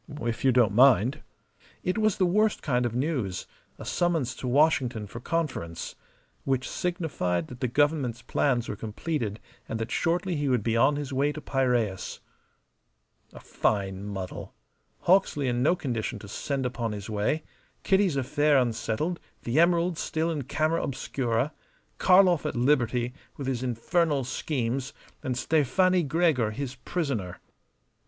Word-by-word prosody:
"If 115 0 -2
you 135 - +5
don't 120 -5 +4
mind." 130 +3 +5 0.6
It 185 - 0
was 215 -2 +2
the 185 - +3
worst 210 +4 +2
kind 125 -4 +1
of 120 - -6
news 125 - -1 0.3
a - - -9
summons 165 -8 0
to 130 - -5
Washington 125 -5 +2
for 110 +3 -8
conference. 130 - -3 0.5
Which 130 -2 0
signified 150 - -2
that 125 - -9
the 130 - 0
Government's 135 -2 +1
plans 125 -5 +1
were - - -3
completed 110 +1 -3 0.3
and 115 - -2
that 115 +1 -4
shortly 175 +2 0
he 145 -2 0
would 125 -5 +2
be 115 0 0
on 130 +5 +4
his 145 -1 -4
way 140 +3 +2
to 155 - -6
Piraeus. 125 -9 -1 1.1
A - - -11
fine 95 -2 -1
muddle! 95 -3 -6 0.5
Hawksley 170 -7 +3
in 120 0 0
no 155 +7 +4
condition 120 -6 -3
to 105 - -10
send 135 +5 -3
upon 120 -3 -2
his 100 -1 -6
way; 110 +9 -1 0.4
Kitty's 190 -5 +3
affair 145 +2 +2
unsettled; 125 +7 0 0.2
the 120 +6 +1
emeralds 170 0 +3
still 160 +1 -1
in 145 -5 -3
camera 155 +4 0
obscura; 130 0 -1 0.5
Karlov 180 -3 +5
at - - -3
liberty 125 -1 +1 0.2
with 140 - -5
his 130 -2 -1
infernal 140 +4 +1
schemes, 130 0 -2 0.3
and 125 -2 -2
Stefani 170 +7 +3
Gregor 150 -6 +2
his 130 +4 -4
prisoner. 125 - -3
130 Hz, 145 wpm, -27 LUFS, 115-160 Hz, 1.1 s, you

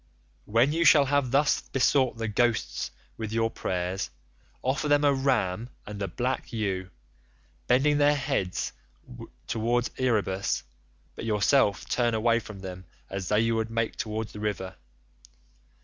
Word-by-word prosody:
"'When 115 +6 +3
you 165 +1 +2
shall 150 -3 +7
have 140 -1 +1
thus 140 +3 +3
besought 130 -1 +2
the 115 0 -2
ghosts 115 +1 0 0.3
with 110 -1 -4
your 115 0 +1
prayers, 90 +1 -2 0.5
offer 130 +4 0
them 145 0 +4
a 145 -1 +5
ram 125 -6 0 0.2
and 105 -1 -7
a 100 - -1
black 125 +9 -2
ewe, 95 -5 -2 0.8
bending 145 +4 +3
their 145 0 +5
heads 130 -10 -1 0.7
towards 120 +2 0
Erebus; 105 -6 0 0.5
but - - -6
yourself 105 0 +2
turn 120 -2 +1
away 115 +1 +3
from 105 -3 -10
them 90 -1 -7 0.3
as 95 -2 -4
though 105 - +1
you 115 +1 +2
would 110 0 -1
make 115 0 -1
towards 110 0 -4
the 105 - -8
river. 100 -3 -3
115 Hz, 145 wpm, -27 LUFS, 105-130 Hz, 0.8 s, shall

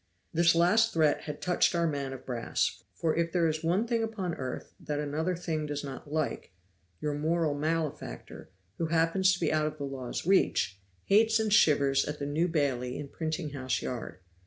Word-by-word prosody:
This 170 0 +4
last 215 +7 +4
threat 155 -3 +2
had 150 -1 -6
touched 180 0 +2
our 170 0 +2
man 140 -4 -2
of 130 -1 -8
brass; 120 -3 -1
for 160 -2 0
if 170 0 0
there 170 -2 +2
is 155 0 -2
one 180 +7 +2
thing 230 -1 0
upon 210 -6 -2
earth 130 -3 -6
that 150 -1 -3
another 155 +5 -1
thing 160 -3 -3
does 145 0 -3
not 140 +1 -8
like, 155 - -2 0.5
your 150 -1 -1
moral 160 +1 +1
malefactor, 155 - -3 0.3
who 165 - 0
happens 165 +4 +3
to 175 - -3
be - - +1
out 155 -1 +2
of 155 0 -5
the 145 - -5
law's 135 -1 -5
reach, 170 - +2 0.3
hates 220 +2 +4
and 215 -2 +1
shivers 140 -7 +4
at 150 0 -4
the 140 - -4
New 155 +5 +1
Bailey 135 -6 -1
in 145 -1 -6
Printing 155 0 -3
house 130 -2 -2
Yard. 120 -6 -5
155 Hz, 190 wpm, -29 LUFS, 145-170 Hz, 0.5 s, This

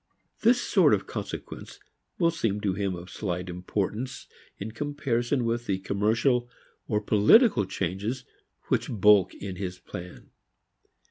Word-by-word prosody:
This 240 +2 +5
sort - - +4
of - - -5
consequence - - -7 0.4
will 170 -2 +3
seem 115 -11 -1
to 100 -2 0
him 95 -1 -2
of 90 +1 -10
slight 90 -3 -3
importance 105 +7 -3 0.3
in 105 +3 -6
comparison 130 -1 -1
with 120 +1 -1
the 95 - +1
commercial 115 +6 +1 0.4
or 105 - +1
political 105 - +5
changes 100 +8 -3 0.4
which - - +1
bulk 105 -3 +4
in 95 -2 -6
his 90 -2 -4
plans. 90 0 -10
105 Hz, 130 wpm, -27 LUFS, 95-120 Hz, 0.4 s, This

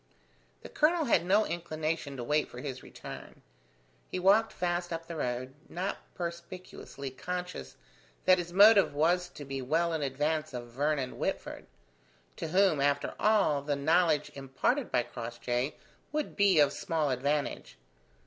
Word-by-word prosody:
The - - -9
colonel 320 +1 +2
had 200 -8 +2
no 205 +3 +4
inclination 155 -4 -3
to 120 - -4
wait 150 +4 +1
for - - -11
his 130 -1 -5
return. - - -10 0.7
He - - -3
walked 200 +5 +4
fast 175 0 -2
up 165 0 -4
the 170 - -7
road, 130 -2 -3 0.2
not 185 +3 -3 0.2
perspicuously 170 -5 -7
conscious 180 +6 -5 0.5
that 185 0 +6
his 175 0 -5
motive 200 -3 +6
was 175 +4 +2
to 145 - -10
be 135 0 -4
well 165 +6 +1
in 160 - -1
advance 150 +2 -1
of 120 -1 -6
Vernon 140 +1 -1
Whitford: - - -3 0.7
to - - -4
whom, 185 -3 +3
after 140 0 +1
all, 205 -10 +3
the 145 0 -1
knowledge 155 +1 +2
imparted 140 - -1
by 120 - +2
Crossjay 120 +2 -3 0.4
would 300 0 -2
be 200 -4 +4
of 145 -1 +5
small 160 -6 -1
advantage. 135 - -2
155 Hz, 150 wpm, -30 LUFS, 140-180 Hz, 0.7 s, that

